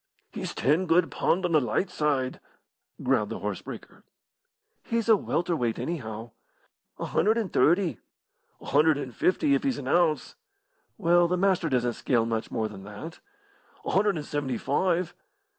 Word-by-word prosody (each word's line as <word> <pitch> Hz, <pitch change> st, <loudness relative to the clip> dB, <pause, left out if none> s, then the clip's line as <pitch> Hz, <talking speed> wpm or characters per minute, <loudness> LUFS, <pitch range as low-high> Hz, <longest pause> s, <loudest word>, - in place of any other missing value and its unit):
"He's -, -, -5 dB
ten 160 Hz, +7 st, +2 dB
good 165 Hz, +1 st, +3 dB
pund 185 Hz, +2 st, +1 dB
on 175 Hz, -, -1 dB
the 155 Hz, -2 st, +4 dB
light 180 Hz, +8 st, -1 dB
side," 140 Hz, -6 st, -1 dB, 0.6 s
growled -, -, +1 dB
the -, -, -4 dB
horse -, -, -4 dB
breaker. -, -, -10 dB, 0.8 s
"He's 230 Hz, -1 st, -2 dB
a 225 Hz, -, +7 dB
welter 175 Hz, -3 st, -1 dB
weight, 120 Hz, -6 st, -1 dB
anyhow." 115 Hz, -8 st, -5 dB, 0.7 s
"A -, -, -4 dB
hundred 220 Hz, +2 st, +2 dB
and 215 Hz, -6 st, -2 dB
thirty." 170 Hz, -, +3 dB, 0.6 s
"A -, -, -14 dB
hundred 150 Hz, +1 st, +3 dB
and 130 Hz, -5 st, -6 dB
fifty, 280 Hz, +10 st, +2 dB
if -, -, +2 dB
he's 270 Hz, -3 st, -1 dB
an 130 Hz, -, -6 dB
ounce." 155 Hz, -2 st, +2 dB, 0.6 s
"Well, 175 Hz, +1 st, +4 dB
the 180 Hz, +1 st, 0 dB
Master 185 Hz, -3 st, +2 dB
doesn't 125 Hz, -2 st, +1 dB
scale 115 Hz, 0 st, +1 dB
much 115 Hz, -1 st, -2 dB
more 110 Hz, -1 st, -1 dB
than 100 Hz, -3 st, -10 dB
that." 105 Hz, -, -9 dB, 0.7 s
"A -, -, -2 dB
hundred 200 Hz, 0 st, +3 dB
and 150 Hz, -, -5 dB
seventy 140 Hz, -5 st, -2 dB
five." 175 Hz, +6 st, 0 dB
160 Hz, 165 wpm, -27 LUFS, 130-180 Hz, 0.8 s, a